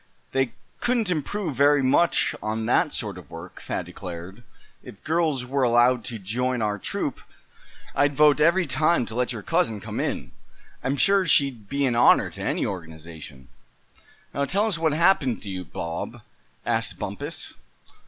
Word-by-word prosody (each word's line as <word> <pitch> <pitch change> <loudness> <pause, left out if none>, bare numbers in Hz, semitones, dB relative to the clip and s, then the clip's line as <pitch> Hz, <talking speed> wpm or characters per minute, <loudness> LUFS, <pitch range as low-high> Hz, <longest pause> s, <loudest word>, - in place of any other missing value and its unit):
"They 135 -3 0 0.3
couldn't 235 -6 +1
improve 170 +2 -2
very 145 +1 +4
much 140 +6 +3
on 110 +1 -2
that 145 +7 +3
sort 100 -5 -3
of 90 - -15
work," 85 +2 -10
Thad - - -3
declared; 90 +2 -8
"and 120 - -18 0.4
if 100 - -13
girls 155 -5 0
were 135 +2 -1
allowed 120 0 +4
to 115 - -5
join 125 +6 -1
our 105 -2 -1
troop - - -3 0.7
I'd 145 0 +2
vote 150 0 +5
every 170 +4 +4
time 150 0 +2
to 110 - -8
let 125 +2 0
your 110 -4 -6
cousin 165 - +1
come - - -5
in. - - -2 0.5
I'm 135 +2 0
sure 195 +3 +3
she'd 130 -9 +2
be 140 0 +1
an 125 - +1
honor 120 +1 +5
to - - -9
any - - 0
organization." 80 -6 -8 0.9
"Now 140 +1 0
tell 200 +8 +1
us 200 -7 -1
what 160 -1 +2
happened 155 -6 +3
to 100 - -5
you, 90 -1 -4
Bob!" 85 0 -5 0.4
asked - - -1
Bumpus. - - -5
130 Hz, 165 wpm, -25 LUFS, 105-155 Hz, 0.9 s, vote